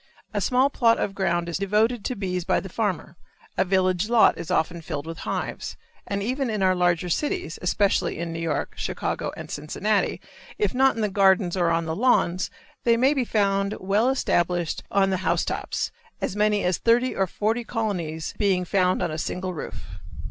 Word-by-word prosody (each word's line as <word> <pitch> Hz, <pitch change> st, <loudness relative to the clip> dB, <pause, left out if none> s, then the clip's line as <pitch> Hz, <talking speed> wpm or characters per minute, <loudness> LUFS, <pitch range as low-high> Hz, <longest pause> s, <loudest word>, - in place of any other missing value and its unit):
A -, -, 0 dB
small 260 Hz, +2 st, +3 dB
plot 230 Hz, -3 st, +3 dB
of 195 Hz, -, -1 dB
ground 175 Hz, -3 st, 0 dB
is 170 Hz, +1 st, -2 dB
devoted 210 Hz, +3 st, +1 dB
to 255 Hz, -, -1 dB
bees 185 Hz, -3 st, -2 dB
by -, -, +2 dB
the 195 Hz, -, -8 dB
farmer, 185 Hz, -5 st, -2 dB, 0.4 s
a -, -, +3 dB
village 185 Hz, +1 st, +1 dB
lot 235 Hz, -2 st, +5 dB
is -, -, -7 dB
often 170 Hz, +1 st, 0 dB
filled 155 Hz, -2 st, -5 dB
with 165 Hz, +1 st, -7 dB
hives, -, -, -4 dB, 0.3 s
and 200 Hz, 0 st, -2 dB
even 255 Hz, +3 st, -1 dB
in 210 Hz, -3 st, -1 dB
our 185 Hz, 0 st, +4 dB
larger 175 Hz, -1 st, +1 dB
cities, 175 Hz, -, -2 dB
especially 195 Hz, +2 st, +1 dB
in 165 Hz, 0 st, -4 dB
New 165 Hz, -, -4 dB
York, 165 Hz, -3 st, -2 dB
Chicago, -, -, -3 dB
and -, -, -8 dB
Cincinnati, 200 Hz, +8 st, -1 dB, 0.4 s
if 420 Hz, -, 0 dB
not 265 Hz, +1 st, +4 dB
in 225 Hz, -, -2 dB
the -, -, +3 dB
gardens 190 Hz, -2 st, +3 dB
or 175 Hz, -2 st, +2 dB
on 165 Hz, 0 st, +1 dB
the 160 Hz, 0 st, -2 dB
lawns, 185 Hz, -6 st, +2 dB, 0.3 s
they 235 Hz, -1 st, +4 dB
may 265 Hz, +4 st, +4 dB
be 270 Hz, -3 st, +1 dB
found 200 Hz, -3 st, +1 dB
well 205 Hz, +6 st, +2 dB
established 175 Hz, -10 st, 0 dB
on 195 Hz, -1 st, +2 dB
the 190 Hz, -, +1 dB
house 185 Hz, -, 0 dB
tops, -, -, -3 dB, 0.3 s
as -, -, -2 dB
many 210 Hz, 0 st, +2 dB
as 180 Hz, -1 st, +1 dB
thirty 240 Hz, +2 st, +2 dB
or 190 Hz, -, +1 dB
forty 220 Hz, +6 st, -1 dB
colonies 180 Hz, -10 st, -3 dB
being 190 Hz, -3 st, +2 dB
found 185 Hz, 0 st, +2 dB
on -, -, -1 dB
a 155 Hz, -, -4 dB
single 185 Hz, +3 st, -3 dB
roof. 155 Hz, -, -8 dB
195 Hz, 190 wpm, -25 LUFS, 175-220 Hz, 0.4 s, lot